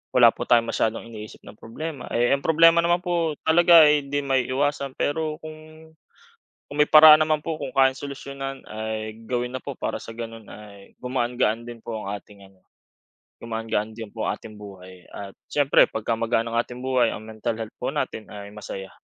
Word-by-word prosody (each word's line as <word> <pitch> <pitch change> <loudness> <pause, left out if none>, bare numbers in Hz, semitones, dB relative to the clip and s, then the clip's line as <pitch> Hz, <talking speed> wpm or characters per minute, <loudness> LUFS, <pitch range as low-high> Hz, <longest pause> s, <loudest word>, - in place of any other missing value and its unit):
wala 120 -2 +8
po - - -6
tayong 115 -1 +3
masyadong 110 0 -1
iniisip 105 -1 -10
na - - -13
problema. 145 +5 -7
E 120 +1 +2
h, - - +5
problema 165 +1 +6
naman 175 +1 +2
po 170 -3 0
talaga 170 0 +7
ay 150 -1 +2
hindi 145 +1 -2
maiiwasan, 135 +1 -1
pero 155 +1 -1
kung 155 0 -12 0.8
kung 145 - -7
may 150 - +5
paraan 155 0 +9
naman 155 -1 0
po 160 -1 -4
kung - - -6
kayang 135 -1 +3
solusyonan 140 -1 -7
ay 110 +1 -6
gawin 125 0 -2
na - - -2
po 140 - -6
para - - -4
sa 115 - -10
gano’n 115 -1 -8
ay 100 -2 -13
gumaan-gaan 120 -2 -1
din 120 -1 -10
po 115 -1 -5
ang 100 -1 -5
ating 100 0 -12
ano, 95 -1 -25 0.8
gumaan-gaan 110 -1 -3
din 110 -3 -8
po 110 - -4
ang - - -2
ating 110 - -12
buhay 95 -3 -13
at 100 -1 -9 0.2
siyempre 145 -1 +4
pag 110 - -6
gumagaan 115 0 0
ang - - 0
ating 125 +1 -10
buhay, 130 -3 +2
ang 110 - -7
mental 110 +1 -4
health 110 -1 -7
po - - -1
natin 110 - -4
ay 100 0 -10
masaya. 95 -2 -8
120 Hz, 190 wpm, -24 LUFS, 110-145 Hz, 0.8 s, paraan